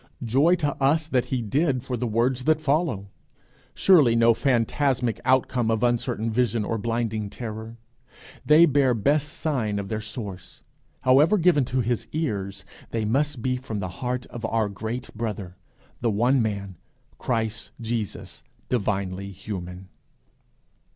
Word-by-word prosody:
Joy 140 Hz, +10 st, +4 dB
to 145 Hz, -5 st, -1 dB
us 150 Hz, +4 st, +3 dB
that 130 Hz, -5 st, +1 dB
he 125 Hz, -3 st, -2 dB
did, 130 Hz, +3 st, 0 dB
for 130 Hz, -1 st, -3 dB
the 120 Hz, +1 st, -2 dB
words 120 Hz, +3 st, 0 dB
that 155 Hz, -1 st, +3 dB
follow 140 Hz, -, 0 dB, 0.6 s
surely 150 Hz, -12 st, +5 dB
no 115 Hz, 0 st, +5 dB
phantasmic 125 Hz, -1 st, +1 dB
outcome 130 Hz, -2 st, +2 dB
of 110 Hz, 0 st, +1 dB
uncertain 115 Hz, -2 st, 0 dB
vision 115 Hz, -2 st, +1 dB
or 115 Hz, -, -2 dB
blinding 110 Hz, -1 st, -2 dB
terror! 110 Hz, 0 st, -7 dB, 0.7 s
They 155 Hz, +3 st, +7 dB
bear 140 Hz, -5 st, +3 dB
best 145 Hz, +7 st, +1 dB
sign 120 Hz, -10 st, -1 dB
of 100 Hz, -1 st, -4 dB
their 110 Hz, -1 st, -2 dB
source: 105 Hz, -4 st, -8 dB, 0.4 s
however 140 Hz, +10 st, +5 dB
given 165 Hz, -6 st, +3 dB
to 130 Hz, +1 st, 0 dB
his 120 Hz, 0 st, -1 dB
ears, 100 Hz, -11 st, -3 dB, 0.2 s
they 115 Hz, -2 st, -2 dB
must 135 Hz, +2 st, 0 dB
be 125 Hz, -1 st, 0 dB
from 125 Hz, -4 st, -5 dB
the 95 Hz, -2 st, -3 dB
heart 125 Hz, 0 st, -2 dB
of 120 Hz, -, -8 dB
our 110 Hz, -2 st, 0 dB
great 110 Hz, +5 st, -5 dB
Brother, 105 Hz, -5 st, -4 dB, 0.4 s
the 115 Hz, -, +1 dB
one 120 Hz, +5 st, +3 dB
Man, 100 Hz, -4 st, -3 dB, 0.4 s
Christ 115 Hz, -2 st, -2 dB
Jesus, 115 Hz, -2 st, -4 dB, 0.3 s
divinely 100 Hz, -4 st, -1 dB
human! 90 Hz, -1 st, -7 dB
120 Hz, 145 wpm, -25 LUFS, 110-135 Hz, 0.7 s, They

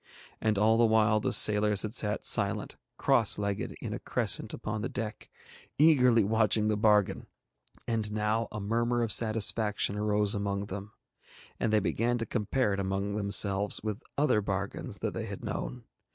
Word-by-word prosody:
And 110 Hz, -2 st, +1 dB
all 110 Hz, +2 st, +3 dB
the 120 Hz, -, +4 dB
while 110 Hz, -1 st, +3 dB
the -, -, -2 dB
sailors 105 Hz, -1 st, +4 dB
had 110 Hz, 0 st, -5 dB
sat 105 Hz, -3 st, -1 dB
silent, -, -, -1 dB, 0.2 s
cross 115 Hz, -4 st, +2 dB
legged 100 Hz, -1 st, -3 dB
in -, -, -5 dB
a -, -, -5 dB
crescent -, -, 0 dB
upon 110 Hz, 0 st, -5 dB
the 115 Hz, -, -3 dB
deck, 110 Hz, -3 st, -6 dB, 0.5 s
eagerly 125 Hz, -7 st, +5 dB
watching 110 Hz, 0 st, +1 dB
the 105 Hz, -, +1 dB
bargain, 105 Hz, -2 st, +2 dB, 0.6 s
and 110 Hz, -2 st, -1 dB
now 110 Hz, +2 st, -1 dB
a 105 Hz, -, -5 dB
murmur 120 Hz, +3 st, 0 dB
of 115 Hz, -, -1 dB
satisfaction 110 Hz, -2 st, +2 dB
arose 105 Hz, -1 st, +1 dB
among 100 Hz, -1 st, -2 dB
them, 100 Hz, +1 st, -7 dB, 0.7 s
and 115 Hz, -, 0 dB
they 110 Hz, -, +4 dB
began 115 Hz, +4 st, -1 dB
to 115 Hz, -, -3 dB
compare 110 Hz, 0 st, -1 dB
it 100 Hz, -, -3 dB
among 95 Hz, +1 st, -2 dB
themselves 100 Hz, -1 st, +1 dB
with 105 Hz, -2 st, -4 dB, 0.2 s
other 140 Hz, -7 st, +2 dB
bargains 100 Hz, 0 st, -4 dB
that -, -, -2 dB
they -, -, -5 dB
had -, -, -8 dB
known. 125 Hz, -1 st, -5 dB
105 Hz, 165 wpm, -29 LUFS, 100-115 Hz, 0.7 s, eagerly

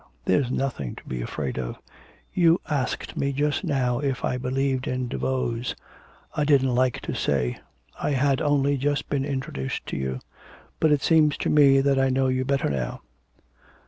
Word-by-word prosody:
there's 125 Hz, +7 st, +2 dB
nothing 125 Hz, -, -2 dB
to -, -, -12 dB
be 65 Hz, -1 st, -4 dB
afraid -, -, -3 dB
of. -, -, -4 dB, 0.6 s
You 170 Hz, -1 st, +4 dB
asked 140 Hz, -5 st, -2 dB
me 140 Hz, -, 0 dB
just 145 Hz, +1 st, 0 dB
now 125 Hz, -3 st, 0 dB
if 135 Hz, -3 st, -1 dB
I -, -, 0 dB
believed 130 Hz, +1 st, -1 dB
in 125 Hz, 0 st, -1 dB
Daveau's, 125 Hz, -1 st, -2 dB, 0.6 s
I 150 Hz, -, 0 dB
didn't 135 Hz, -3 st, +3 dB
like 125 Hz, 0 st, +1 dB
to -, -, -4 dB
say; 60 Hz, 0 st, 0 dB, 0.4 s
I -, -, 0 dB
had 135 Hz, 0 st, +2 dB
only 145 Hz, -1 st, +2 dB
just 145 Hz, +2 st, -1 dB
been 135 Hz, -2 st, 0 dB
introduced 130 Hz, -, -4 dB
to -, -, -4 dB
you; 65 Hz, -1 st, -3 dB, 0.6 s
but 160 Hz, -, +3 dB
it 145 Hz, -2 st, +2 dB
seems 155 Hz, -3 st, +4 dB
to -, -, -1 dB
me 140 Hz, -2 st, +6 dB
that 135 Hz, -1 st, +2 dB
I 135 Hz, 0 st, +3 dB
know 130 Hz, 0 st, +2 dB
you 130 Hz, 0 st, +1 dB
better 135 Hz, +1 st, 0 dB
now... 65 Hz, -3 st, -3 dB
135 Hz, 175 wpm, -25 LUFS, 125-140 Hz, 0.6 s, me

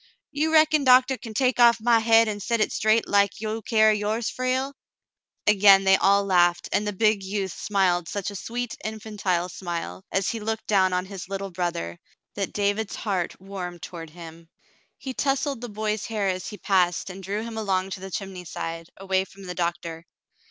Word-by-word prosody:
"You 310 Hz, +2 st, 0 dB
reckon 310 Hz, -2 st, +5 dB
doctah 255 Hz, 0 st, +5 dB
kin 225 Hz, -3 st, -9 dB
take 255 Hz, 0 st, +1 dB
off 235 Hz, -1 st, +6 dB
my 230 Hz, +1 st, +4 dB
hade 225 Hz, 0 st, +5 dB
an' 210 Hz, -1 st, -3 dB
set 230 Hz, +3 st, -1 dB
hit 215 Hz, -, +1 dB
straight 220 Hz, +1 st, +2 dB
like 200 Hz, -1 st, +2 dB
you 220 Hz, +1 st, -3 dB
carry 215 Hz, -1 st, +3 dB
yours, 215 Hz, +2 st, -1 dB
Frale? 255 Hz, +2 st, -1 dB, 0.4 s
" -, -, -68 dB, 0.3 s
Again 200 Hz, -1 st, +6 dB
they 190 Hz, 0 st, +6 dB
all 200 Hz, +1 st, +3 dB
laughed, 175 Hz, -2 st, +3 dB
and 205 Hz, +1 st, 0 dB
the -, -, 0 dB
big 215 Hz, 0 st, +2 dB
youth 195 Hz, -1 st, -3 dB
smiled 180 Hz, -4 st, 0 dB
such 205 Hz, 0 st, -3 dB
a -, -, -9 dB
sweet, 240 Hz, +4 st, -4 dB
infantile 210 Hz, -5 st, -2 dB
smile, 175 Hz, 0 st, -5 dB
as 195 Hz, -1 st, 0 dB
he 230 Hz, -, -4 dB
looked 220 Hz, +1 st, -3 dB
down 190 Hz, -3 st, +3 dB
on 180 Hz, 0 st, -1 dB
his 190 Hz, -1 st, -8 dB
little 195 Hz, 0 st, -4 dB
brother, 170 Hz, -, -3 dB, 0.3 s
that 195 Hz, -2 st, -3 dB
David's 205 Hz, +1 st, -1 dB
heart 190 Hz, -6 st, -3 dB
warmed 185 Hz, -3 st, -7 dB
toward 165 Hz, -2 st, -8 dB
him. 165 Hz, 0 st, -12 dB, 0.5 s
He 265 Hz, -, -6 dB
tousled 275 Hz, -1 st, -1 dB
the 245 Hz, -, -6 dB
boy's 215 Hz, 0 st, -2 dB
hair 215 Hz, -3 st, -1 dB
as 185 Hz, -1 st, -3 dB
he 210 Hz, -, -7 dB
passed 185 Hz, -2 st, +1 dB
and 190 Hz, +1 st, -9 dB
drew 200 Hz, +3 st, -3 dB
him 230 Hz, -1 st, -7 dB
along 195 Hz, -3 st, -1 dB
to' 190 Hz, -, -5 dB
the 190 Hz, +1 st, -8 dB
chimney 190 Hz, -1 st, -6 dB
side, 165 Hz, -1 st, -5 dB
away 190 Hz, -1 st, 0 dB
from 195 Hz, +1 st, -14 dB
the 180 Hz, -1 st, -5 dB
doctor. 170 Hz, -1 st, -3 dB
200 Hz, 195 wpm, -25 LUFS, 185-220 Hz, 0.5 s, off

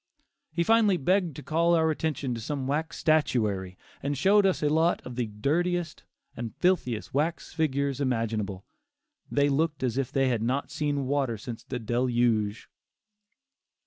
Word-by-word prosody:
He 170 Hz, +2 st, 0 dB
finally 215 Hz, -1 st, +4 dB
begged 175 Hz, 0 st, +1 dB
to 150 Hz, -, -8 dB
call 170 Hz, +2 st, +2 dB
our 160 Hz, -1 st, +3 dB
attention 150 Hz, -4 st, -2 dB
to 115 Hz, -, -5 dB
some 135 Hz, +3 st, -3 dB
wax 150 Hz, +4 st, -2 dB
statuary, 105 Hz, -, +1 dB, 0.2 s
and 140 Hz, 0 st, -2 dB
showed 195 Hz, +6 st, +5 dB
us 185 Hz, -, 0 dB
a 150 Hz, -, +3 dB
lot 160 Hz, +3 st, +2 dB
of 125 Hz, -, -7 dB
the 120 Hz, -2 st, -1 dB
dirtiest 160 Hz, +10 st, -1 dB, 0.3 s
and 115 Hz, -1 st, -6 dB
filthiest 165 Hz, -12 st, 0 dB
wax 155 Hz, +5 st, -1 dB
figures 140 Hz, -3 st, 0 dB
imaginable. 110 Hz, -7 st, -1 dB, 0.6 s
They 145 Hz, 0 st, +2 dB
looked 150 Hz, 0 st, 0 dB
as 125 Hz, +1 st, 0 dB
if 135 Hz, -, -2 dB
they 135 Hz, -1 st, +2 dB
had 120 Hz, -4 st, 0 dB
not 130 Hz, +5 st, -1 dB
seen 145 Hz, -2 st, -1 dB
water 135 Hz, -4 st, 0 dB
since 115 Hz, +2 st, -7 dB
the -, -, -4 dB
Deluge. 120 Hz, -2 st, 0 dB
140 Hz, 155 wpm, -27 LUFS, 120-160 Hz, 0.6 s, showed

